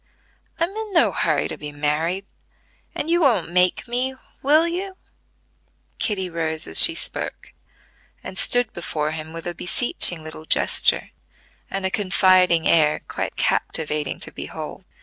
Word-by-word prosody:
I'm 335 +3 0
in 435 -2 -6
no 335 - +4
hurry - - 0
to - - -8
be 150 0 -6
married; 155 +6 -2 0.7
and - - -3
you 345 +1 +2
won't 220 - +2
make 180 +5 +1
me: 250 +2 -2 0.3
will 305 +4 +4
you?" 375 +3 -5 1.0
Kitty 195 -4 -1
rose 160 -2 -3
as 80 - +7
she - - +9
spoke, - - -5 0.7
and 190 - -8
stood 245 +3 +2
before 155 -3 -3
him 155 0 -7
with 165 0 -8
a 175 - -3
beseeching 175 -2 -1
little 155 0 -10
gesture, - - +2 0.6
and 195 -1 -3
a 190 - 0
confiding 185 -4 +3
air 150 -2 +3
quite - - -4
captivating 150 -3 -2
to - - -3
behold. - - -8
180 Hz, 145 wpm, -22 LUFS, 160-245 Hz, 1.0 s, she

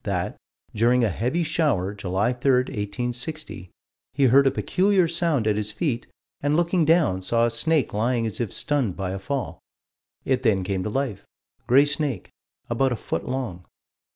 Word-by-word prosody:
that, - - -2 0.4
during 120 +3 +3
a 115 - +3
heavy 125 - -1
shower, 145 - 0
July 100 +4 -1
3, 125 0 +3
1860, 125 - -4 0.5
he 140 - +2
heard 135 +2 +6
a - - +6
peculiar 185 +6 +2
sound 165 -7 0
at 105 -1 +2
his 105 0 -3
feet, 120 -2 -2 0.3
and 145 +1 +1
looking 175 +1 +2
down, 155 - +3
saw 115 +5 +2
a 120 - 0
snake 130 +4 +1
lying 115 +2 0
as 110 +1 -3
if 115 - -2
stunned 135 -11 -1
by 95 -2 -3
a 95 - -4
fall. 120 - -4 0.7
It 130 -1 +1
then 105 -7 +2
came 95 0 -2
to 105 - -3
life. 120 -4 -2 0.4
Gray 135 +4 +6
snake, 145 - -2 0.4
about 130 +3 +1
a - - 0
foot - - -4
long. 125 -9 -4
125 Hz, 170 wpm, -24 LUFS, 105-145 Hz, 0.7 s, heard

